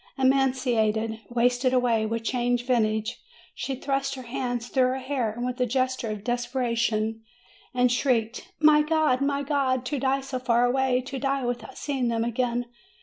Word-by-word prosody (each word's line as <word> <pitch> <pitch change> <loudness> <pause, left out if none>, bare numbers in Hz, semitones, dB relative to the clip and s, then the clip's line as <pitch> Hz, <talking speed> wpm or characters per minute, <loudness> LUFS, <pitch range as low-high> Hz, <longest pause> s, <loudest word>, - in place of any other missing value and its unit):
Emaciated, 250 -5 +1
wasted 245 +2 +2
away, 230 -3 +2
with 230 +1 -3
changed 245 0 0
visage, 220 -3 0 0.3
she 270 - -4
thrust 275 +1 -2
her 260 - -8
hands 245 -1 -3
through 255 -1 +2
her 255 +1 -1
hair, 260 -5 -2
with 250 +1 -3
a - - +4
gesture 255 -1 -1
of 210 -2 -5
desperation, 235 -2 -1 0.5
and 250 -1 +2
shrieked: 245 - 0
"My 305 -1 +6
God! 305 -4 +2
My 280 0 0
God! 265 -3 0
To 275 +2 -2
die 270 +1 +1
so 270 -1 -4
far 245 -1 +2
away, 255 0 +2
to 265 +1 -6
die 275 -1 0
without 245 +2 -4
seeing 270 -4 -1
them 230 -1 0
again! 240 +1 -1
250 Hz, 160 wpm, -26 LUFS, 235-265 Hz, 0.5 s, My